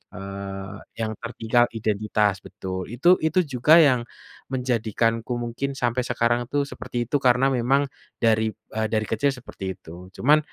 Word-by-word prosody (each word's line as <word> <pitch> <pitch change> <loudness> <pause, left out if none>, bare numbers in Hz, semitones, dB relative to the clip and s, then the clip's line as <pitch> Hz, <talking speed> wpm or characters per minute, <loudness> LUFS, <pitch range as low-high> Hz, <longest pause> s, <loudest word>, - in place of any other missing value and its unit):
eee, 95 +1 -6 0.3
yang 110 -1 -1
tertinggal 120 0 +2
identitas 105 -1 +1
betul 95 -1 -5
itu 140 +9 +2
itu 160 +3 +2
juga 125 +6 +4
yang, 125 -3 +2 0.5
menjadikanku 115 -1 0
mungkin 130 +4 -3
sampai 120 +1 0
sekarang 120 +1 +1
tuh 145 0 +2
seperti 120 -3 -4
itu - - -1
karena 125 +1 +4
memang, 135 +3 +2 0.4
dari, 110 -1 +3 0.3
eee, 110 0 0
dari 110 0 +1
kecil 135 +6 +1
seperti 95 -7 -7
itu 90 +2 -11
cuman, 150 +4 +5
115 Hz, 140 wpm, -24 LUFS, 105-125 Hz, 0.5 s, cuman